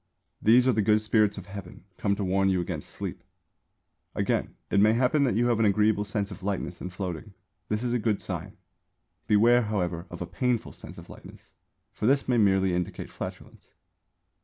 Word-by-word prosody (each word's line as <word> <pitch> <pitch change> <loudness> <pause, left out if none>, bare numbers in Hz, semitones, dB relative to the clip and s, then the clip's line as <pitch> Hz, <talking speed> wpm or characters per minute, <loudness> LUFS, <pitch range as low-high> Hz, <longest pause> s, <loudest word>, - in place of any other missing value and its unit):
These 120 +4 +5
are - - +5
the 110 - +1
Good 105 +1 +4
Spirits 110 -1 +2
of 95 - -7
Heaven, 100 -4 -10
come 100 -1 0
to 100 - -3
warn 95 +1 +2
you 95 -1 +1
against 85 -3 -4
sleep. - - -6 0.9
Again, - - -1 0.2
it 100 - +3
may 105 +2 +5
happen 130 +5 +2
that 125 - +1
you 120 +2 +2
have 120 -2 +2
an 110 - +3
agreeable 105 0 +2
sense 105 0 -3
of 100 - -9
lightness 95 -3 -3
and 90 - -5
floating; 95 +2 -6 0.3
this 105 +2 -1
is 120 -1 -1
a 125 - +1
good 110 -2 0
sign. - - -6 0.7
Beware, 115 +4 +5
however, 90 -6 -2
of 85 - -8
a 90 - -3
painful 125 +5 -1
sense - - -11
of - - -11
lightness; - - -14 0.4
for 105 - -2
this 135 +2 +2
may 125 -2 +2
merely 95 -3 +3
indicate 90 0 -3
flatulence. - - -9
105 Hz, 190 wpm, -27 LUFS, 95-115 Hz, 0.9 s, These